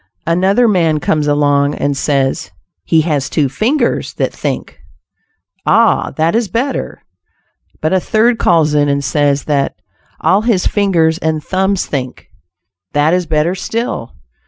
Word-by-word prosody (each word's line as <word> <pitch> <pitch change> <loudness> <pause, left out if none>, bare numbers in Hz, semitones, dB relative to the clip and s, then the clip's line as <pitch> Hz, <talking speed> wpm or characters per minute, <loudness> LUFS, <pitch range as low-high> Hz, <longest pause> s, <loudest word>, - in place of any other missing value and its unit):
Another 190 +8 +2
man 165 -7 +2
comes 150 0 0
along, 145 -1 +2
and 145 0 -1
says 135 -1 -1 0.4
"he 160 - +3
has 150 -4 -1
two 150 -4 +1
fingers 230 - -1
that - - -1
think." - - -4 0.8
"Ah! - - +3
that 160 +1 +1
is 230 -1 +1
better." 250 +8 -3 0.8
But 155 +3 0
a 190 - +3
third 225 +5 +1
calls 160 -3 +3
in 145 -1 +2
and 140 0 0
says 145 0 +1
that 140 -2 -1 0.4
"all 195 +2 +2
his 220 -5 +1
fingers 170 -5 +1
and 160 -2 -2
thumbs 190 0 0
think." 130 -3 -5 0.6
That 145 +3 +2
is 180 -1 0
better 155 +2 +1
still. 225 - -4
160 Hz, 140 wpm, -15 LUFS, 145-190 Hz, 0.8 s, he